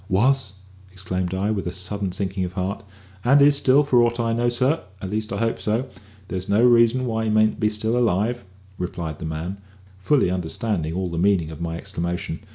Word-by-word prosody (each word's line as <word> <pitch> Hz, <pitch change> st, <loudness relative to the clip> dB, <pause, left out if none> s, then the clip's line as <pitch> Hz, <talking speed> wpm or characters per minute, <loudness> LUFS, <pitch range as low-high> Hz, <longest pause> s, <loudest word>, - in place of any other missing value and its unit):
"Was?" 115 Hz, +2 st, +2 dB, 0.4 s
exclaimed 90 Hz, -1 st, -3 dB
I, 100 Hz, +3 st, 0 dB
with 100 Hz, -4 st, -2 dB
a -, -, -2 dB
sudden 95 Hz, +1 st, -2 dB
sinking 95 Hz, +1 st, -2 dB
of 90 Hz, 0 st, -4 dB
heart. 95 Hz, +1 st, -3 dB, 0.4 s
"And 140 Hz, +4 st, +5 dB
is 145 Hz, 0 st, +6 dB
still, 140 Hz, +1 st, +4 dB
for 130 Hz, -4 st, +4 dB
aught 120 Hz, 0 st, +1 dB
I 115 Hz, -1 st, +1 dB
know, 120 Hz, +1 st, +1 dB
sir; 130 Hz, +6 st, +1 dB, 0.2 s
at 95 Hz, 0 st, -6 dB
least 110 Hz, +1 st, -2 dB
I 100 Hz, -, -2 dB
hope 115 Hz, +2 st, -1 dB
so; 115 Hz, +5 st, -1 dB, 0.4 s
there's 95 Hz, 0 st, -4 dB
no 105 Hz, +4 st, +4 dB
reason 120 Hz, +1 st, +4 dB
why 110 Hz, -2 st, -1 dB
he -, -, 0 dB
mayn't 110 Hz, 0 st, +2 dB
be 105 Hz, -1 st, +2 dB
still 110 Hz, +2 st, -1 dB
alive," 120 Hz, +1 st, +1 dB, 0.4 s
replied 85 Hz, -3 st, -4 dB
the -, -, -5 dB
man, 85 Hz, +5 st, -5 dB, 0.4 s
fully 130 Hz, -2 st, +2 dB
understanding 90 Hz, -1 st, -2 dB
all 95 Hz, -1 st, -2 dB
the 85 Hz, -, -2 dB
meaning 90 Hz, -4 st, +2 dB
of 80 Hz, +1 st, -9 dB
my 85 Hz, -1 st, -3 dB
exclamation. 85 Hz, -3 st, -4 dB
100 Hz, 200 wpm, -23 LUFS, 90-120 Hz, 0.4 s, is